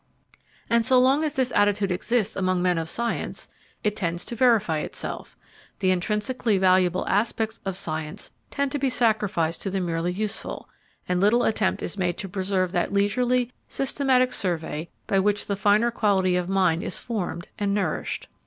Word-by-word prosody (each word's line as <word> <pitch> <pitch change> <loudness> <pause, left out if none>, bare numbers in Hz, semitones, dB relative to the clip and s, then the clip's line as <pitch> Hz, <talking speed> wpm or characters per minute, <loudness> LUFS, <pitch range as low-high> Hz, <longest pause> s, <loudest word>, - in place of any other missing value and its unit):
And 235 0 +3
so 255 +3 +4
long 265 +4 +4
as 305 -1 -2
this 260 -2 +1
attitude 205 -1 +2
exists 215 +4 0
among 185 -1 +1
men 180 -1 +2
of 165 0 -3
science, 235 +4 -3 0.3
it 210 -1 0
tends 170 -3 -2
to 235 - -5
verify 215 -10 +3
itself: - - -6 0.4
the 185 -1 +2
intrinsically 210 +4 0
valuable 185 -1 +3
aspects 220 +1 0
of 195 -1 -3
science 160 +4 -4 0.2
tend 280 -1 -1
to 290 - -2
be 270 0 +1
sacrificed 210 -9 +1
to 195 - -2
the 195 0 -1
merely 170 -1 -1
useful, 210 +3 -3 0.4
and 180 0 0
little 220 +5 +4
attempt 215 -3 0
is 205 - -4
made 175 -1 0
to 195 - -4
preserve 190 -1 -1
that - - 0
leisurely, 245 +5 +1 0.2
systematic 260 -2 +1
survey 165 -4 -2 0.2
by 195 - +2
which 205 +1 +1
the 200 - -1
finer 210 +4 +3
quality 190 -5 +2
of 180 0 -1
mind 185 -4 +2
is - - -2
formed 180 -7 -4
and 200 -1 0
nourished. 185 -7 -2
200 Hz, 170 wpm, -25 LUFS, 180-235 Hz, 0.4 s, so